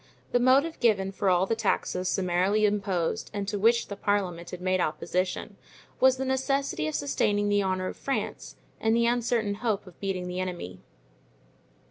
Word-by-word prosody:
The 245 - +3
motive 275 +6 +3
given 200 -5 +2
for 195 0 0
all 180 0 +3
the 225 - 0
taxes 185 -4 0
summarily 190 +4 +2
imposed 200 -2 -1
and 200 -1 -3
to 205 0 -2
which 230 +3 +3
the 200 - -6
parliament 190 -4 -1
had 180 - -7
made 185 0 +1
opposition, 180 +4 -2 0.4
was 260 0 +5
the 265 - -2
necessity 265 - 0
of 155 - -3
sustaining 205 +9 +1
the 205 0 +3
honor 185 -1 -1
of - - -5
France 275 - -3 0.2
and 225 0 +2
the 235 0 +3
uncertain 235 -3 +1
hope 220 -5 0
of 180 -3 -15
beating 190 -2 -3
the 180 0 -4
enemy. 175 - -5
200 Hz, 170 wpm, -27 LUFS, 185-230 Hz, 0.4 s, was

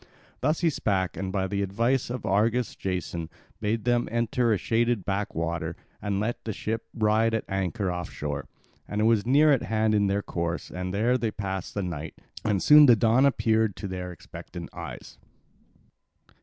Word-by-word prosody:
Thus 155 +5 0
he 165 -2 +3
spake, 95 - -1
and 95 -1 -3
by 95 -1 0
the 100 +1 -2
advice 115 +7 0
of 120 -3 -4
Argus 110 +4 +1
Jason 90 -3 -3 0.3
bade 110 0 -1
them 120 -1 +2
enter 115 +1 +1
a 105 - +3
shaded 115 0 0
backwater 85 -4 -2 0.3
and 100 -1 -1
let 110 +3 -2
the 110 - -3
ship 110 +3 -3
ride 110 +1 +2
at 110 - -1
anchor 95 0 -1
off 90 -1 -4
shore; 75 -1 -4 0.4
and 105 - -3
it - - +2
was 115 -1 +3
near 145 +4 +5
at 135 - +3
hand 110 0 +1
in 100 -1 +3
their 100 +1 0
course 85 0 -3
and 90 0 -4
there 115 +6 +2
they 115 - 0
passed 95 -3 -5
the 100 - -1
night. 80 -3 -5 0.3
And 100 -3 +1
soon 150 0 +8
the 120 - +8
dawn 115 +5 +4
appeared 110 -6 +2
to 100 - -5
their 90 -1 -5
expectant 85 - -10
eyes. - - -9
105 Hz, 180 wpm, -27 LUFS, 95-115 Hz, 0.4 s, soon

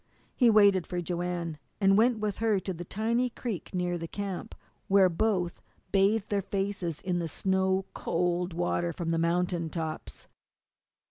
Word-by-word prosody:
He 245 -3 +5
waited 200 -4 +5
for 180 - -3
Joanne, 175 -2 -3 0.2
and 195 -1 +5
went 230 +3 +4
with 210 -2 -2
her 220 -3 +2
to 190 0 -4
the 175 0 -6
tiny 230 +7 0
creek 230 -6 -5
near 180 -1 -1
the 165 - -5
camp, 200 0 -5 0.3
where 195 -1 +5
both 180 -1 0 0.3
bathed 200 +2 +2
their 205 -1 +1
faces 195 -4 -2
in 180 -2 -1
the 170 - -2
snow 190 +3 +1
cold 175 +1 -1
water 175 0 -1
from 165 +1 -3
the 165 - +1
mountain 170 0 0
tops. 160 -1 -5
185 Hz, 155 wpm, -29 LUFS, 175-200 Hz, 0.3 s, He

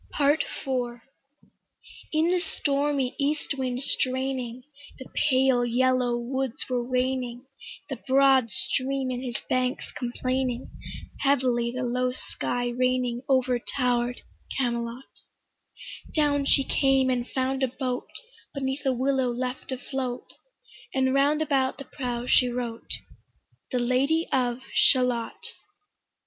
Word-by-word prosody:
PART 290 +2 +3 0.2
IV 245 -3 -1 1.1
In 320 +2 +3
the 365 - +3
stormy 280 -5 0
east 290 +1 0
wind 255 -1 -2
straining, 255 -2 -1 0.3
The 260 - -9 0.2
pale 260 -2 +4
yellow 250 0 +2
woods 260 +2 -2
were 250 -2 0
waning, 250 0 -1 0.4
The 270 -4 -4
broad 265 -2 +5
stream 265 +3 -1
in 250 0 -3
his 245 -2 -3
banks 255 +1 0
complaining, 255 0 -2 0.5
Heavily 250 -4 +2
the 255 +1 -3
low 250 +1 0
sky 245 -1 -3
raining 250 0 0
Over 255 -2 +3
tower'd 245 -1 0 0.4
Camelot; 240 0 -2 1.1
Down 290 -2 +2
she 275 0 +4
came 270 -1 +3
and 245 -1 -1
found 265 0 -1
a 265 - +3
boat 255 0 -3 0.5
Beneath 265 0 -2
a 265 - +4
willow 260 0 +1
left 250 +2 -3
afloat, 260 -1 -4 0.6
And 260 0 +2
round 290 +3 +3
about 270 -3 +1
the 275 - -8
prow 245 -2 -4
she 250 0 +4
wrote 240 -2 -4 0.8
'The 255 - +1
Lady 265 +7 +2
of 250 -1 +1
Shalott.' 250 -3 +2
255 Hz, 120 wpm, -27 LUFS, 245-270 Hz, 1.1 s, broad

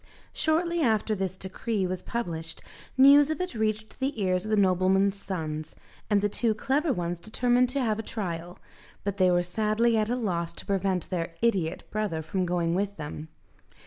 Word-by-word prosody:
Shortly 340 +2 +1
after 220 -4 +2
this 190 -2 -3
decree 190 +2 -2
was 185 0 -3
published, 165 -8 -4 0.3
news 280 +2 +8
of 315 - -2
it 365 -3 -2
reached 220 -1 -2
the 270 -2 -2
ears 185 -1 +1
of - - -5
the 215 - +2
nobleman's 190 +1 +3
sons, 155 -6 -5 0.3
and 205 -1 +3
the - - +4
two 220 +1 +1
clever 280 +7 +1
ones 175 -4 -2
determined 245 +4 +2
to 275 +2 -1
have 220 -2 0
a - - 0
trial, 175 -6 -5 0.5
but 200 0 -2
they 185 -1 +4
were 175 0 +3
sadly 215 +5 +1
at 215 0 0
a 245 - +1
loss 175 -9 -2
to - - -8
prevent 190 -2 -1
their 165 -2 -2
idiot 190 -9 +1
brother 205 -7 -2
from 180 +3 -1
going 170 -1 0
with 200 +2 -1
them. 150 0 -6
200 Hz, 180 wpm, -27 LUFS, 180-230 Hz, 0.5 s, news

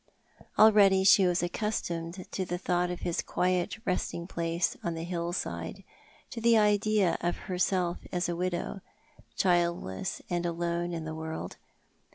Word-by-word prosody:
Already 200 -3 +6
she 190 0 +6
was 175 0 +1
accustomed 175 -2 -3
to 190 - -2
the 175 -1 -3
thought 180 -1 0
of 180 - -5
his 170 - -1
quiet 180 +3 0
resting 180 -2 -2
place 170 0 -1
on 170 -1 -2
the 165 - -4
hillside, 175 0 -4 0.5
to 230 - -5
the 230 0 +5
idea 210 -2 +3
of 175 0 -1
herself 180 -1 0
as 180 0 0
a 175 - -2
widow, 180 +2 -3 0.6
childless 175 - 0
and 175 -1 -1
alono 170 0 -1
in 165 -2 -4
the 160 - -4
world. 160 0 -6
175 Hz, 145 wpm, -29 LUFS, 170-190 Hz, 0.6 s, Already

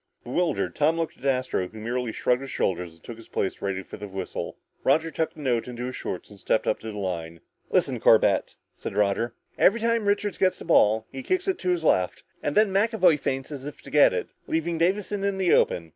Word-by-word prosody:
Bewildered, 170 +8 -1
Tom 155 +2 +2
looked 165 -1 -3
at - - -11
Astro 130 -8 0
who 110 - -13
merely 120 +1 -2
shrugged 125 +3 +1
his 135 - -7
shoulders 90 -6 -2
and 80 - -23
took 115 - -8
his 115 - -13
place 95 - -2
ready 95 -1 -2
for - - -10
the 105 0 -7
whistle. 95 -1 -5 0.3
Roger 160 +1 +2
tucked 160 0 -2
the 155 - -10
note 125 -4 0
into 125 0 -5
his 130 - -5
shorts 90 - -5
and 100 - -13
stepped 110 - +1
up - - +1
to 110 - -6
the 105 - -8
line. 85 -4 -4 0.3
"Listen, - - +1
Corbett," - - +4 0.2
said - - -6
Roger, 105 +3 +1 0.2
"every 220 +5 +5
time 230 -2 +1
Richards 205 0 0
gets 185 -1 +3
the - - -10
ball, 110 -9 +4
he 135 - -6
kicks 370 - -1
it 385 - 0
to 185 - -2
his 175 -2 +1
left, 90 - +2 0.2
and 145 - -1
then 210 -2 +4
McAvoy 195 -6 +4
feints 135 +1 -3
as 140 -1 -6
if 145 - -9
to - - -11
get 150 - +6
it, - - -3 0.2
leaving 165 +1 -1
Davison 195 +3 0
in 200 -1 0
the 185 -2 +3
open. 85 -2 +2
135 Hz, 230 wpm, -26 LUFS, 105-180 Hz, 0.3 s, get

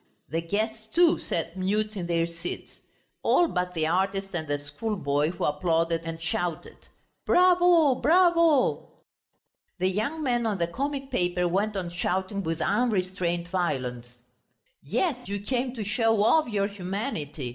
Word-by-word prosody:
The 165 +4 -1
guests, 220 +5 -3
too, 335 +7 +3
sat 165 +1 -3
mute 210 +3 -1
in 180 -4 -4
their 165 -1 +1
seats. 170 +1 -8 0.4
All 350 - +4
but 180 - -2
the 160 -1 0
artist 195 +3 0
and 160 -3 -3
the 145 0 0
schoolboy, 145 -1 -2
who 175 - -5
applauded 165 +2 +1
and 165 0 -5
shouted, 170 0 -4 0.4
"Bravo, 355 -5 +5
bravo!" 335 -1 +3 0.8
The 185 +1 +1
young 235 +12 -2
man 240 -4 +1
on 210 -3 -1
the 170 - +1
comic 275 +8 -4
paper 180 0 +1
went 200 +4 0
on 175 -2 -4
shouting 190 +3 -2
with 165 -2 -3
unrestrained 185 -6 0
violence: 130 -9 -2 0.7
"Yes, 265 -9 -1
you 200 0 -3
came 250 +4 -1
to 220 - -4
show 220 0 +2
off 310 +7 +4
your 200 -3 0
humanity! 185 - -4
190 Hz, 145 wpm, -26 LUFS, 170-230 Hz, 0.8 s, Bravo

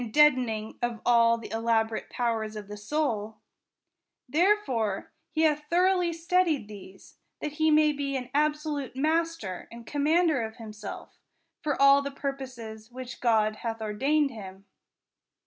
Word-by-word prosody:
deadening 250 -7 +3
of 240 -2 -1
all 230 -1 +5
the 230 - -8
clamorous 225 0 0
powers 225 -3 -2
of 210 -2 -7
the 205 - -7
soul; 220 -2 -2 0.9
therefore 275 - +1 0.2
he 315 - 0
hath 300 -1 +1
throughly 360 0 +3
studied 335 - +1
these, 195 -2 -13 0.2
that 300 - -3
he 315 +1 +1
may 305 0 +5
be 280 -1 -3
an 250 -1 -5
absolute 300 -2 0
master 310 - -1
and 235 0 -10
commander 305 +1 +2
of 220 0 -5
himself, 215 -3 -9 0.4
for 295 -4 -1
all 275 0 +7
the 280 - -3
purposes 255 -6 -6
which 255 0 -8
God 215 -3 +2
hath 225 0 -4
ordained 275 +7 +1
him. 195 -4 -10
255 Hz, 135 wpm, -28 LUFS, 220-300 Hz, 0.9 s, all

